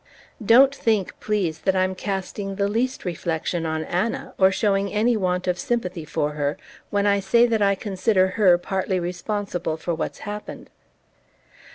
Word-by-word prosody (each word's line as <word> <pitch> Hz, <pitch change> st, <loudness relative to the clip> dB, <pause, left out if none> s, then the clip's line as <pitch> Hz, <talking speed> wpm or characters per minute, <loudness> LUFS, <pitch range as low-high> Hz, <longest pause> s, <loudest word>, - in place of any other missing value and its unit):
"Don't 260 Hz, +6 st, +6 dB
think, 220 Hz, -8 st, 0 dB
please, 185 Hz, -7 st, -1 dB
that 190 Hz, +2 st, 0 dB
I'm 185 Hz, 0 st, +1 dB
casting 195 Hz, +1 st, -4 dB
the 200 Hz, 0 st, 0 dB
least 235 Hz, +4 st, -1 dB
reflection 170 Hz, -1 st, -2 dB
on 160 Hz, 0 st, -2 dB
Anna, 185 Hz, +8 st, -2 dB
or 190 Hz, 0 st, +6 dB
showing 195 Hz, 0 st, +1 dB
any 225 Hz, +3 st, +2 dB
want 180 Hz, -3 st, -1 dB
of 180 Hz, -1 st, 0 dB
sympathy 180 Hz, -7 st, -2 dB
for 150 Hz, -1 st, -1 dB
her, 145 Hz, -1 st, -2 dB, 0.3 s
when 205 Hz, 0 st, 0 dB
I 200 Hz, 0 st, +3 dB
say 215 Hz, +5 st, +4 dB
that 225 Hz, -3 st, 0 dB
I 200 Hz, -1 st, +3 dB
consider 190 Hz, -1 st, +1 dB
her 185 Hz, -3 st, +4 dB
partly 190 Hz, +1 st, -2 dB
responsible 180 Hz, -1 st, -3 dB
for 170 Hz, +2 st, -3 dB
what's 160 Hz, -, -4 dB
happened. 210 Hz, 0 st, -7 dB
190 Hz, 160 wpm, -23 LUFS, 175-210 Hz, 0.3 s, Don't